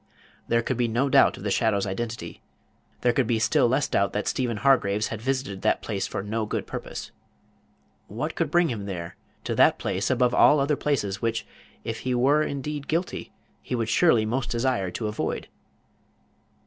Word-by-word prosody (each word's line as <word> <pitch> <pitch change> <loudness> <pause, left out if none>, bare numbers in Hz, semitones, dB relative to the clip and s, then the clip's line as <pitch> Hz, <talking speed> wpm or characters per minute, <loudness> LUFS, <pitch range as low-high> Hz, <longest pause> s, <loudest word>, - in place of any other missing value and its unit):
There 115 0 +2
could 130 - -2
be 120 -1 +1
no 120 +5 +1
doubt - - +5
of - - -10
the - - -1
shadow's 100 -3 +1
identity; 105 -2 -5 0.6
there 120 -1 +3
could 125 -2 +1
be 115 - +2
still 125 +4 +3
less 130 +4 +1
doubt 100 - +1
that 105 - -2
Stephen 120 -4 -1
Hargraves 105 -5 +2
had 110 -2 -5
visited 130 -6 -2
that - - +1
place 100 -3 -2
for - - -4
no 110 +1 -2
good - - -3
purpose. - - -7 1.0
What - - -4
could - - -1
bring 175 -1 +3
him 105 -4 -5
there 85 -4 -5 0.3
to - - -2
that - - +5
place - - -2
above 125 -1 +2
all 150 - +6
other 140 +2 +2
places, 105 -11 -1
which, 115 -1 -1 0.4
if 115 0 -4
he 130 -1 -1
were 140 +5 +3
indeed 145 0 -3
guilty, 170 +3 -2 0.3
he 125 - -3
would 115 -2 -1
surely 120 -5 +4
most 120 +3 -2
desire 120 -5 0
to 105 +5 -4
avoid? 105 - -3
120 Hz, 185 wpm, -25 LUFS, 105-135 Hz, 1.0 s, all